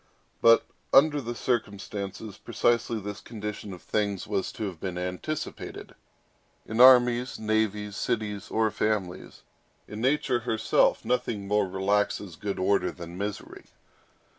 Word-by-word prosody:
But, 115 0 +6 0.3
under 145 +1 +5
the 120 -1 -5
circumstances, 100 -3 -3
precisely 115 -1 0
this 105 0 -7
condition 105 -2 -6
of 90 - -10
things 100 -3 -1
was 95 - -2
to 110 - -4
have 90 -5 -6
been 90 0 -4
anticipated. 90 +12 -5 0.7
In 110 +2 0
armies, 125 -1 +6
navies, 105 -1 -1
cities, 110 -3 -2
or 110 -1 +1
families, 105 -5 -2 0.4
in 105 +1 -7
nature 130 -1 +2
herself, 110 -1 +2
nothing 120 -5 -1
more 105 -1 +2
relaxes 100 -1 0
good 100 +3 -4
order 100 +2 +1
than 85 0 -9
misery. 100 +2 -6
105 Hz, 125 wpm, -27 LUFS, 100-115 Hz, 0.7 s, But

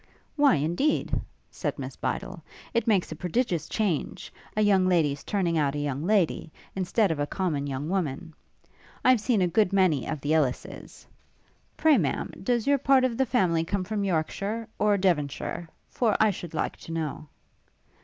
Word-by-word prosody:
'Why, 285 - +5
indeed,' 170 - 0 0.4
said - - -3
Miss - - -6
Bydel, - - -4 0.3
'it 235 0 0
makes 200 -5 +2
a - - -4
prodigious 180 -1 -1
change, 195 -9 -2 0.2
a - - +3
young 195 -3 +4
lady's 155 -6 +1
turning 175 -5 0
out 145 -1 +1
a - - -2
young 145 -1 -2
lady, 190 -6 +1 0.2
instead 190 +1 +1
of 155 - -2
a 145 - 0
common 155 -7 -2
young 140 +2 -3
woman. 165 -3 -2 0.7
I've 255 -4 +5
seen 220 -4 +2
a - - +3
good 205 +2 +2
many 185 -9 +2
of 155 - -3
the 145 +2 -1
Ellis's. 145 -6 -2 0.7
Pray, 310 -6 +5
Ma'am, 145 -6 -1
does 235 +2 0
your 280 0 +3
part 270 -1 +4
of 255 -2 +1
the 265 +2 +1
family 175 -9 +2
come 190 +3 -2
from 205 +2 -2
Yorkshire? 200 +5 -2
or 210 -1 +3
Devonshire? 170 -2 -1 0.2
for 225 -4 +1
I 220 -1 +5
should 175 -3 -8
like - - -2
to - - -10
know.' 155 -2 -4
185 Hz, 170 wpm, -27 LUFS, 155-215 Hz, 0.7 s, Why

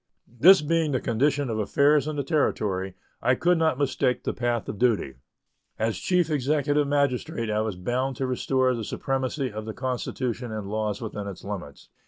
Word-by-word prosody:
This 185 +4 +8
being 160 -1 +1
the 130 - +2
condition 140 +5 +1
of 110 - -2
affairs 140 +7 +3
in 155 - -3
the 140 - -1
Territory, 100 - 0 0.3
I 125 +2 +3
could 175 +4 +2
not 160 -5 +2
mistake 135 -2 0
the - - -1
path 120 -2 -1
of 105 - -5
duty. 115 - +1 0.6
As 110 -5 -1
Chief 180 -3 +2
Executive 145 +1 +1
Magistrate 130 -5 0
I 105 0 +1
was 110 -3 -2
bound 125 +8 -2
to 135 - -2
restore 130 0 +1
the 115 -2 -3
supremacy 135 +3 -2
of 110 +1 -6
the 110 - -6
Constitution 125 -2 -3
and 110 -2 -4
laws 105 0 -2
within 105 -2 -5
its 100 - -8
limits. 95 -8 -7
125 Hz, 180 wpm, -26 LUFS, 110-145 Hz, 0.6 s, This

